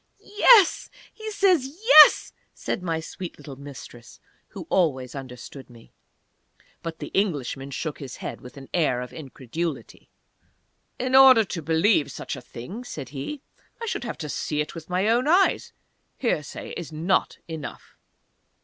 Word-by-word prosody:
"Yes! 415 -2 +4 0.2
He 435 -1 -7
says 370 -10 +2 0.2
yes!" 310 -11 +8 0.2
said - - -4
my 165 -3 -2
sweet 175 +2 -8
Mistress, 135 -4 -11 0.3
who - - -9
always 130 -9 +1
understood 130 0 -9
me. 115 -2 -17 0.9
But 165 -1 -6
the - - -7
Englishman 140 - -2
shook 150 +2 -5
his 135 -3 -8
head, - - -7
with 125 +3 -13
an 135 -1 -10
air 150 -8 +1
of 125 - -8
incredulity. 155 +2 -6 0.9
"In 255 +1 -3
order 260 -3 +8
to 175 -3 -5
believe 160 +1 +2
such - - -6
a - - -9
thing," 190 - -9
said 150 - -8
he, 150 - -6 0.4
"I 465 - -5
should 425 - -3
have 235 - -5
to 155 - -6
see 150 +1 -3
it 150 - -2
with 165 0 -10
my 185 +3 0
own 240 +5 +2
eyes 365 +5 +3 0.5
hearsay 155 - -3
is 170 -2 -7
not 165 +5 0
enough." 160 -3 -8
165 Hz, 150 wpm, -24 LUFS, -, 0.9 s, yes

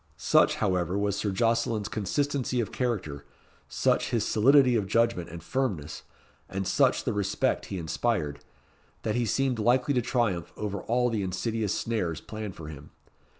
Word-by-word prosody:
Such, - - +4
however, 90 -2 0
was 100 -1 0
Sir 100 +1 -1
Jocelyn's 115 +1 +1
consistency 130 +5 -1
of 115 - -2
character, 90 - -2 0.5
such - - +1
his 115 -4 0
solidity 130 +3 +5
of 105 -4 0
judgment 115 -6 +1
and 85 +1 -9
firmness, 95 - -2 0.5
and 95 0 -3
such - - +3
the - - -1
respect 100 -2 0
he 95 - -4
inspired, 80 -3 -1 0.6
that 110 - 0
he 120 0 0
seemed 130 +2 0
likely 125 +5 +3
to 125 - +2
triumph 115 - -1
over 100 -2 -3
all 125 +1 +1
the 110 -3 -1
insidious 105 +3 -1
snares 95 -9 -2
planned 110 -3 -7
for 80 - -9
him. 75 -2 -10
105 Hz, 155 wpm, -28 LUFS, 95-120 Hz, 0.6 s, solidity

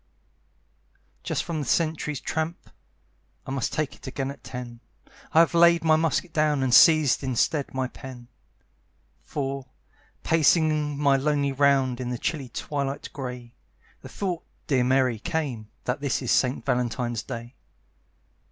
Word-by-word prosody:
Just - - -2
from 165 -2 -3
the 145 - -4
sentry's 155 -3 0
tramp 160 +2 -4 0.7
(I - - -6
must 135 -3 -1
take 155 -2 -2
it - - -13
again 135 +1 -3
at 140 -3 -13
ten), 125 -2 -7 0.5
I 160 - +6
have 170 - +2
laid 170 0 +5
my 160 -1 +5
musket 165 +2 0
down, 150 -3 +2
And 130 -2 +1
seized 155 -1 +6
instead 135 +3 0
my 130 -1 0
pen; 125 -2 -11 0.9
For, 135 -1 -4 0.6
pacing 155 -2 +2
my 140 -1 +3
lonely 140 0 +1
round 135 -2 +2
In 125 - -3
the 125 - -2
chilly 140 -1 -3
twilight 140 +2 -4
gray, 125 -3 -7 0.5
The - - -10
thought, 180 -4 -3 0.2
dear 130 -4 +2
Mary, 130 -2 +2
came, 125 -6 -3
That 125 +3 -2
this 135 -3 -1
is 125 - -1
St. 130 0 +1
Valentine's 120 -1 -1
Day. 120 +2 -7
140 Hz, 145 wpm, -25 LUFS, 125-155 Hz, 0.9 s, I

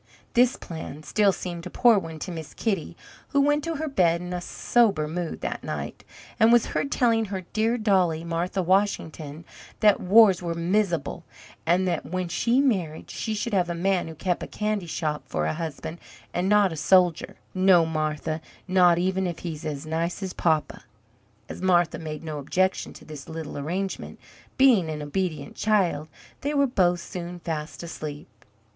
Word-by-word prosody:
This 245 +1 +4
plan, 160 -2 -8
still, 205 +4 +3
seemed 175 -1 -6
a - - -7
poor 230 +1 +5
one 165 -3 -7
to 185 - -4
Miss 160 -3 -8
Kitty, 190 -7 -2 0.3
who 280 - +1
went 295 +1 +2
to 330 -1 -2
her 315 +2 -3
bed 175 - +2
in 180 +1 -6
a 180 - -3
sober 200 -5 +2
mood 170 +1 -4
that - - -4
night, - - -5 0.4
and 225 0 +6
was 240 -1 +5
heard 280 - -1
telling 230 -3 +2
her 195 -2 -4
dear 225 +2 +2
dollie, 185 -7 +2
Martha 175 +3 -1
Washington, 170 -5 0 0.3
that 210 -2 +5
"wars 195 -1 +6
were 170 -1 -3
mis'able, 175 -2 0 0.5
and 180 +3 +3
that 170 -3 -1
when 185 +3 -3
she 235 +8 +2
married 190 - 0
she 220 -2 -3
should 215 +2 -3
have 180 -3 +2
a 170 - -2
man 185 +1 +1
who 160 - -8
kept 175 +3 -1
a - - -5
candy 210 -4 -2
shop 155 -1 -2
for 75 - -1
a 80 - 0
husband, 160 +1 -5 0.3
and 180 +2 0
not 205 -4 +4
a - - -5
soldier 175 +2 +3 0.2
no, 185 -3 +5
Martha, 155 0 -2 0.3
not 180 -2 +5
even 190 +1 0
if 170 -2 -4
he's 160 -2 -5
as 145 0 -4
nice 165 +5 -2
as 190 - -4
papa!" 160 -3 0 0.6
As - - -8
Martha 175 -3 +2
made 155 -1 -6
no 155 -2 -4
objection 185 +7 0
to - - -14
this 150 -1 -9
little 160 -2 -6
arrangement, 180 +7 -4 0.4
being 240 -11 +5
an 150 -1 -4
obedient 155 -1 -3
child, 185 -8 +1 0.3
they 290 +1 -1
were 280 0 +4
both 180 -9 +2
soon 175 0 -6
fast 160 -2 -5
asleep. 155 -3 -7
175 Hz, 175 wpm, -25 LUFS, 160-200 Hz, 0.6 s, and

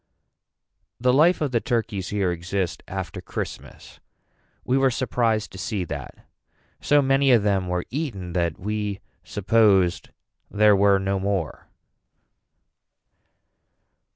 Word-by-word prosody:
The 125 +1 +2
life 160 +6 +4
of 145 -4 0
the 115 -2 +1
turkies 110 -5 -2
here 100 -3 0
exist 90 +1 -3
after 95 -1 -5
Christmas. - - -8 0.7
We 125 - +1
were 135 0 +4
surprised 115 -4 -1
to 95 - -10
see 100 0 -2
that. 70 -6 -8 0.5
So 145 0 +3
many 135 0 +3
of 115 -4 +5
them 100 -3 +1
were 90 0 -2
eaten 115 - -4
that 85 -3 -1
we 105 0 -3 0.2
supposed 100 -3 +2 0.4
there 105 0 +4
were 100 0 +4
no 95 0 -1
more. 95 -4 -3
100 Hz, 120 wpm, -24 LUFS, 95-120 Hz, 0.7 s, of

